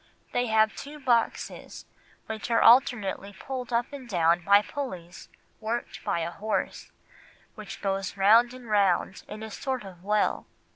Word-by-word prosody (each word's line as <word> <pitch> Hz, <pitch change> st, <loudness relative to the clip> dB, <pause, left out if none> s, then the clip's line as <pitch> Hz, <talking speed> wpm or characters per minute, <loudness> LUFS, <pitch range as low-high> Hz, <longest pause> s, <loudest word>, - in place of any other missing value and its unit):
They 245 Hz, 0 st, 0 dB
have 220 Hz, -1 st, +3 dB
two 295 Hz, +2 st, -9 dB
boxes 240 Hz, -4 st, -1 dB, 0.4 s
which 220 Hz, +1 st, -5 dB
are 230 Hz, -1 st, +3 dB
alternately 220 Hz, -5 st, +4 dB
pulled 255 Hz, -2 st, -5 dB
up 240 Hz, +4 st, 0 dB
and 260 Hz, -4 st, -9 dB
down 170 Hz, -2 st, +2 dB
by 200 Hz, +2 st, +5 dB
pullies 185 Hz, -11 st, -7 dB, 0.3 s
worked 230 Hz, +2 st, -4 dB
by 170 Hz, -, -1 dB
a 165 Hz, +1 st, -3 dB
horse, 215 Hz, +4 st, -3 dB, 0.6 s
which -, -, -9 dB
goes 195 Hz, 0 st, -2 dB
round 225 Hz, +5 st, +5 dB
and 255 Hz, -2 st, -11 dB
round 200 Hz, -3 st, +1 dB
in 215 Hz, +1 st, -8 dB
a 220 Hz, -, -7 dB
sort 260 Hz, +2 st, -3 dB
of 185 Hz, -3 st, -12 dB
well." 210 Hz, +1 st, 0 dB
220 Hz, 150 wpm, -27 LUFS, 195-245 Hz, 0.6 s, by